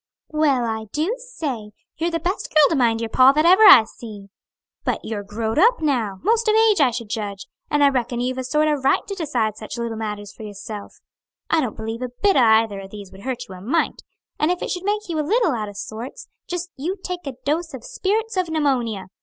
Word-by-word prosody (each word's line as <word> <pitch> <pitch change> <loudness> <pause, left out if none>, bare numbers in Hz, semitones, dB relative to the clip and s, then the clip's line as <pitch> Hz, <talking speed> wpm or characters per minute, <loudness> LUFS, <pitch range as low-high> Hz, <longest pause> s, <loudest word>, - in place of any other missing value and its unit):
"Well, 295 -5 +2
I 220 -1 -3
do 320 +9 0
say! 285 - -5 0.2
you're 335 +1 0
the 330 -1 -2
best 360 +5 -2
girl 305 -2 +6
to 330 - +1
mind 230 -4 +2
your 230 - -3
pa 260 +1 +6
that 305 +2 +2
ever 370 +5 +6
I 260 - +10
see! 215 -3 -11 0.5
But - - -1
you're 220 -2 -3
growed 220 +5 -2
up 475 +6 +5
now 240 -10 0
'most 455 +3 +2
of 430 - +4
age, 440 -5 +4
I 270 - +5
should 235 -1 -5
judge 205 -2 -4 0.2
and 295 -1 +2
I 280 - +7
reckon 245 -2 -1
you've 255 +1 -2
a - - -2
sort 300 +4 +1
o' 305 - +3
right 270 - +2
to 400 - -5
decide 245 - -1
such 215 - -7
little 235 -1 -3
matters 210 -2 -5
for - - -14
yourself. 205 0 -8 0.5
I 325 - +4
don't 245 -6 -3
believe 225 +2 -5
a 250 - -3
bit 390 +12 +1
o' - - +5
either 220 -3 +4
of 195 0 -9
these 200 -2 -10
would 190 - -13
hurt 250 0 -4
you 190 - -10
a 180 - -10
mite; 280 - 0 0.4
and 305 - +2
if 360 0 -1
it - - -3
should 360 +1 -4
make 420 +1 -1
you 330 -3 -2
a - - +3
little 405 +4 +2
out 215 -5 -3
o' - - -10
sorts 220 +5 -7 0.2
just 355 0 -4
you 345 +9 -3
take 360 -4 -5
a 275 - -3
dose 315 +1 -1
of 240 - -10
spirits 435 - -2
of 365 -2 0
pneumonia. 255 -10 0
260 Hz, 235 wpm, -22 LUFS, 220-335 Hz, 0.5 s, I